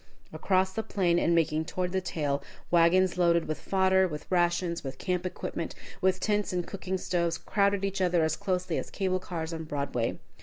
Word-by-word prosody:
Across 190 -1 +1
the 220 - -1
plain, 175 -5 +1
and 170 - +2
making 160 -1 +1
toward 180 +2 -2
the 190 0 0
trail, 145 -5 -1 0.3
wagons 180 +2 +4
loaded 170 -1 +3
with 155 - -3
fodder, 190 -1 +3
with 150 -3 -6
rations, 175 -1 +1
with 135 -1 -6
camp 180 -1 -1
equipment, 170 -1 -5 0.3
with 185 -1 +2
tents 210 +1 0
and 180 -1 -1
cooking 190 -1 -3
stoves, 170 -2 0
crowded 200 -1 +1
each 195 0 -2
other 175 -2 +3
as 160 0 +1
closely 185 +1 -1
as - - -6
cable 185 -2 -1
cars 170 -3 -5
on 160 0 -4
Broadway. 140 -6 -2
180 Hz, 185 wpm, -29 LUFS, 165-190 Hz, 0.3 s, wagons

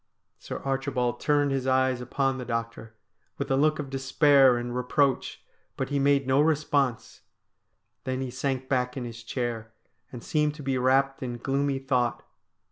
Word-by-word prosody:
Sir - - -6
Archibald 135 -3 -1
turned 145 -1 +2
his 135 -1 -1
eyes 130 -1 +2
upon 135 +2 -1
the - - -4
doctor 115 -1 -5 0.4
with - - -3
a - - +4
look 155 +3 +2
of 140 -3 -6
despair 135 -1 +4
and 120 0 -4
reproach, 130 +2 0 0.3
but - - -2
he 145 -1 0
made 140 0 +3
no 135 +2 +3
response. 145 -5 0 0.8
Then 130 0 -2
he 130 -2 -4
sank 130 0 -2
back 125 -1 -1
in 125 - -4
his 115 -1 -8
chair 115 -2 -4 0.4
and 120 -2 -9
seemed 150 -1 0
to 150 - -9
be 135 -1 0
wrapped 135 +2 +2
in 120 -2 -4
gloomy 135 +2 -1
thought. 130 -3 -1
130 Hz, 165 wpm, -27 LUFS, 125-140 Hz, 0.8 s, a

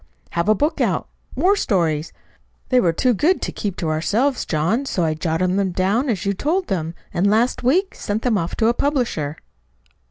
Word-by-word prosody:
"Have 170 +4 0
a 215 - +5
book 295 +9 0
out - - 0 0.3
war 390 +3 +3
stories. 165 - 0 0.6
They 255 - +4
were 175 -8 +3
too 245 +9 +2
good 325 - +2
to - - -2
keep 200 -4 -4
to 165 - -2
ourselves, 220 - 0
John, 180 - 0
so 180 - 0
I 160 -1 +1
jotted 165 +3 0
them 195 -2 0
down 205 +10 +1
as 200 -6 -1
you 200 - +1
told 340 - -1
them, 165 -3 -2 0.2
and 190 +4 +2
last 225 +4 +2
week 355 +11 +2
I - - -19
sent 210 +2 -3
them 245 -3 +2
off 170 -4 -2
to 225 - +2
a 235 - +4
publisher." 240 - -1
205 Hz, 200 wpm, -21 LUFS, 170-255 Hz, 0.6 s, a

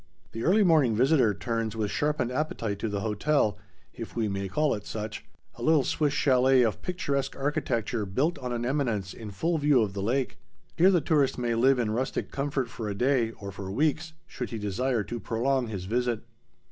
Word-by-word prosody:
The 115 - -6
early 205 +5 +4
morning 155 - +4
visitor 130 -1 +4
turns 115 0 -2
with 105 -2 -2
sharpened 150 -4 0
appetite 115 -8 -2
to 110 - -2
the 100 -1 -2
hotel, 110 +1 +1 0.3
if - - -8
we 115 -2 0
may 100 -1 -2
call 150 +10 +1
it 105 - -5
such,—a 105 -1 -8
little 155 -3 +4
Swiss 150 +1 +1
chalet 130 -2 +4
of 110 -3 -1
picturesque 140 -7 -2
architecture 125 -6 -1
built 145 - 0
on 125 -2 -4
an 120 0 -2
eminence 120 -9 -1
in 110 -2 -8
full 160 - -1
view 145 -5 +4
of 100 -3 -3
the 100 - -4
lake. 125 +6 -1 0.4
Here 180 +3 +6
the 180 -4 +3
tourist 145 -3 +2
may 120 -1 0
live 130 +4 +4
in 115 -3 0
rustic 125 +4 -2
comfort 140 -2 -1
for 115 -2 -5
a 100 - -3
day, 125 +1 +2
or 100 -2 -8
for 95 -1 -7
weeks, 155 - 0
should 125 - -6
he 115 - -4
desire 110 +3 -1
to 120 +3 -5
prolong 120 +4 0
his 100 -4 -5
visit. 120 +2 -1
125 Hz, 195 wpm, -27 LUFS, 110-145 Hz, 0.4 s, Here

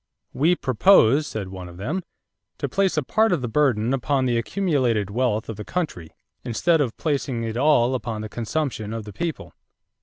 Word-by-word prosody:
"We 165 +6 +3
propose," 140 - +4
said 100 -4 -5
one 95 -1 -8
of 85 - -12
them, 150 - -3 0.6
"to - - -2
place 195 -4 0
a 155 - +2
part 220 - +2
of 175 -6 +1
the - - -1
burden 120 -2 +1
upon 135 0 0
the 120 -2 +1
accumulated 120 - 0
wealth 110 -2 0
of 110 - -6
the 105 - -6
country 105 - -4 0.3
instead 160 +7 +2
of 125 -5 -2
placing 135 -6 -1
it 115 -1 -3
all 130 -2 +3
upon 115 -3 -3
the 110 - -5
consumption 115 -1 -3
of 115 -2 -5
the 105 - -9
people." 165 - -4
125 Hz, 185 wpm, -23 LUFS, 110-150 Hz, 0.6 s, propose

